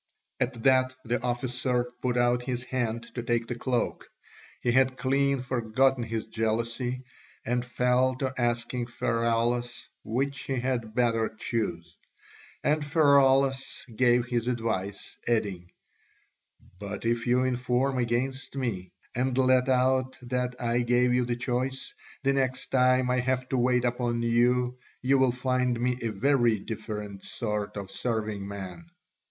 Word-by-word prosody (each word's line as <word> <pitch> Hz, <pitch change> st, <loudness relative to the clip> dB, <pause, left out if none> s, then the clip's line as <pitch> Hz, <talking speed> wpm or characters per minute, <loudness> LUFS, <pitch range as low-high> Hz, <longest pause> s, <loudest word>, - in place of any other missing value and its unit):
At 125 Hz, -2 st, -2 dB
that 130 Hz, -1 st, +4 dB
the 120 Hz, 0 st, 0 dB
officer 125 Hz, 0 st, 0 dB, 0.2 s
put 125 Hz, -1 st, 0 dB
out 120 Hz, 0 st, +3 dB
his 125 Hz, -1 st, -3 dB
hand 120 Hz, -3 st, -2 dB
to 120 Hz, -, -3 dB
take 120 Hz, 0 st, 0 dB
the 120 Hz, -, -4 dB
cloak; 120 Hz, 0 st, -2 dB, 0.5 s
he 120 Hz, -, +1 dB
had 130 Hz, +1 st, +3 dB
clean 140 Hz, +1 st, +1 dB
forgotten 130 Hz, +1 st, +1 dB
his 115 Hz, -1 st, -3 dB
jealousy, 115 Hz, +3 st, -2 dB, 0.4 s
and 120 Hz, +1 st, 0 dB
fell 125 Hz, +1 st, +2 dB
to 130 Hz, 0 st, -2 dB
asking 120 Hz, 0 st, -1 dB
Pheraulas 120 Hz, +1 st, 0 dB, 0.2 s
which 135 Hz, +4 st, -1 dB
he 135 Hz, -, -1 dB
had 120 Hz, -3 st, -2 dB
better 115 Hz, -2 st, +2 dB
choose. 110 Hz, -6 st, -3 dB, 0.7 s
And 150 Hz, 0 st, +2 dB
Pheraulas 135 Hz, -2 st, +3 dB
gave 120 Hz, 0 st, +4 dB
his 120 Hz, -1 st, -1 dB
advice, 110 Hz, -5 st, -2 dB
adding, 100 Hz, -7 st, -1 dB, 1.1 s
"But 100 Hz, +2 st, -6 dB
if 115 Hz, 0 st, 0 dB
you 125 Hz, +1 st, +3 dB
inform 130 Hz, +1 st, 0 dB
against 125 Hz, +3 st, -1 dB
me, 100 Hz, -9 st, -3 dB, 0.2 s
and 125 Hz, +1 st, 0 dB
let 130 Hz, 0 st, +4 dB
out 130 Hz, 0 st, +2 dB
that 125 Hz, 0 st, -2 dB
I 120 Hz, 0 st, +1 dB
gave 125 Hz, +1 st, +3 dB
you 125 Hz, 0 st, +2 dB
the 120 Hz, 0 st, -1 dB
choice, 125 Hz, +2 st, -2 dB, 0.3 s
the 135 Hz, 0 st, +3 dB
next 130 Hz, -2 st, -1 dB
time 130 Hz, -1 st, +3 dB
I 125 Hz, -, +2 dB
have 130 Hz, +1 st, 0 dB
to 130 Hz, -, 0 dB
wait 125 Hz, 0 st, +2 dB
upon 120 Hz, -1 st, 0 dB
you 125 Hz, +2 st, +2 dB, 0.2 s
you 135 Hz, +1 st, +4 dB
will 130 Hz, -1 st, +4 dB
find 125 Hz, -1 st, 0 dB
me 125 Hz, +1 st, 0 dB
a 115 Hz, -, -1 dB
very 120 Hz, +1 st, +2 dB
different 105 Hz, -1 st, -6 dB
sort 105 Hz, -3 st, -3 dB
of 100 Hz, -1 st, -6 dB
serving 105 Hz, -2 st, -2 dB
man." 100 Hz, -, -7 dB
125 Hz, 140 wpm, -28 LUFS, 115-130 Hz, 1.1 s, that